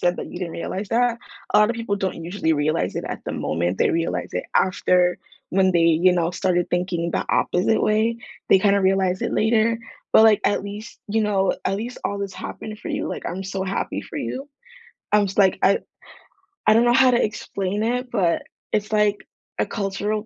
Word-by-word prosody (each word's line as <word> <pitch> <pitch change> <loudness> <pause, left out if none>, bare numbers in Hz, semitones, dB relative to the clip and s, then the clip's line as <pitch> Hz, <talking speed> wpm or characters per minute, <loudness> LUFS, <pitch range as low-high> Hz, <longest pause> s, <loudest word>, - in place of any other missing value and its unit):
said 175 0 +1
that - - -5
you - - -7
didn't 175 -3 -4
realize 190 +4 -4
that? 235 +1 +1 0.3
A - - +6
lotta 210 +3 +4
people 230 -3 -2
don't 190 -4 -3
usually 170 -2 0
realize 145 - 0
it - - -3
at - - -5
the - - -4
moment, 85 +2 -1
they - - +3
realize 165 0 -1
it - - -2
after 180 -1 +2 0.3
when 190 0 +3
they, 170 - +3
you 165 +2 +4
know, 170 -1 +1
started 175 -1 0
thinking 175 -1 -1
the - - -2
opposite 185 +5 +1
way? 220 +2 +2 0.3
They 190 - +6
kinda 200 +1 +3
realize 190 -1 +1
it - - -2
later, 225 +1 +2 0.4
but 220 - +8
like, 215 -2 +5
at 205 - +1
least, 210 +3 -8
you 220 +2 +1
know, 195 -2 +1
at 195 - 0
least 235 +4 -6
all 200 - -2
this 200 -1 -4
happened 215 -1 -7
for - - -8
you, - - -2
like, - - -5
I'm 185 +2 -4
so 190 0 -3
happy 190 +1 -2
for - - -9
you. 270 +3 -4 0.6
I 210 - +5
was 200 -2 -1
like, 190 -2 +4
I 200 - +4 0.9
I - - +7
don't 230 +2 +4
know 240 - +4
how 260 +1 +6
to 240 - +3
explain 205 -1 -3
it, 250 +2 -1
but 180 -7 +1 0.3
it's 210 0 -1
like 210 -1 +2 0.4
a - - +2
cultural 205 +2 -3
195 Hz, 205 wpm, -22 LUFS, 180-215 Hz, 0.9 s, but